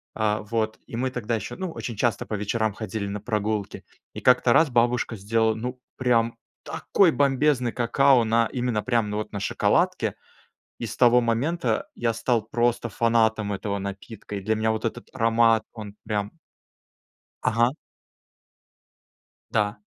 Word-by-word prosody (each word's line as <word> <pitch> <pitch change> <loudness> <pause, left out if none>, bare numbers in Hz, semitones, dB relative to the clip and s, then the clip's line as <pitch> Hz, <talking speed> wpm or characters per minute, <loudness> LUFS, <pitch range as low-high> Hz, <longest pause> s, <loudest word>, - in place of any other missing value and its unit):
э, 110 -1 +1
вот, 110 0 -2
и - - -8
мы 130 +1 0
тогда 115 -2 -2
еще, 110 -1 -5
ну, 185 -2 -4
очень 120 -7 -6
часто 115 +2 0
по - - -7
вечерам 105 +1 -1
ходили 110 -1 -4
на 100 0 -5
прогулки. 105 -2 -2 0.3
И - - -6
как-то 125 -1 +4
раз 160 +3 +5
бабушка 120 -1 +1
сделала, 110 +2 +1
ну, 125 +3 -5 0.2
прям 115 -2 +2 0.3
такой 185 -5 +2
бомбезный 135 -3 +2
какао, 125 +1 +3
на 115 +1 +2
именно 120 -5 -2
прямо, 115 -3 +1
ну, 105 0 -3
вот, 105 - -4
на 100 - -4
шоколадке, - - +1 0.7
и 115 - -2
с 110 - -7
того 125 0 +5
момента 120 +1 0
я 115 -1 0
стал 115 0 0
просто 120 +1 0
фанатом 110 -1 +1
этого 100 +1 -3
напитка, 100 +2 -7
и - - -3
для 110 +3 0
меня 110 0 +1
вот 110 - -4
этот 115 +1 -4
аромат, 115 -2 +3
он 105 -3 -9
прям 105 -1 -2 1.1
Ага. 120 +3 +2 1.8
Да. 105 -2 0
115 Hz, 155 wpm, -25 LUFS, 105-120 Hz, 1.8 s, раз